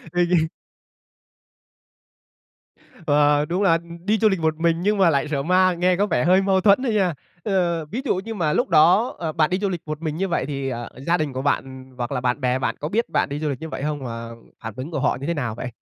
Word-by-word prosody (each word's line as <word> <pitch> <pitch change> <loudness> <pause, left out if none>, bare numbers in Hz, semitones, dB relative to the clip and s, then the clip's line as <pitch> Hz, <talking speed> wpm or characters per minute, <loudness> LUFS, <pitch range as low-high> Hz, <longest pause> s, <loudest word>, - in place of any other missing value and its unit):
Ô 175 - +3
kê. 165 -3 +3 2.6
Ờ, 145 0 +3
đúng 175 +6 -1
là, 195 - +4
ừm, 170 +2 -4
đi 215 +1 +2
du 220 0 +4
lịch 190 -3 -1
một 160 -1 +1
mình 165 0 +2
nhưng 205 +1 +1
mà 185 -3 +5
lại 140 0 0
sợ 140 -2 -1
ma, 185 +3 +3
nghe 180 +1 +2
có 205 +3 +1
vẻ 125 -10 0
hơi 185 +3 +4
mâu 190 -1 +2
thuẫn 200 +5 +4
á 260 - 0
nha. 195 -6 +1 0.3
Ờ, 175 -5 0
ví 220 - -5
dụ 255 - +1
như 220 +4 -5
mà 160 -6 0
lúc 245 - +1
đó, 175 +8 +4
ờ, 160 -2 -3
bạn 155 -1 +1
đi 185 - +1
du 200 0 -1
lịch 175 -4 -4
một 155 +1 -5
mình 155 -2 -3
như 190 +3 -1
vậy 170 - -1
thì, 140 -2 -3
ờ, 120 -2 -4 0.2
gia 170 - +3
đình 155 -4 -2
của 130 +1 -4
bạn, 145 - +1
ừm, 130 -1 -12
hoặc 120 -1 -3
là 125 - -1
bạn 125 +2 -1
bè 125 -1 +1
bạn 130 - -1
có 150 - -3
biết 225 +7 0
bạn - - 0
đi 145 0 -4
du 155 0 -2
lịch 135 -3 -4
như 160 - -6
vậy 145 - -6
hông? 145 -2 -3
Và 115 -1 -6 0.3
phản 110 -3 -7
ứng 130 +5 -6
của 155 - -3
họ - - +1
như 140 - -5
thế 170 - 0
nào 125 -7 -3
vậy? 125 - -5
165 Hz, 265 wpm, -22 LUFS, 140-185 Hz, 2.6 s, mà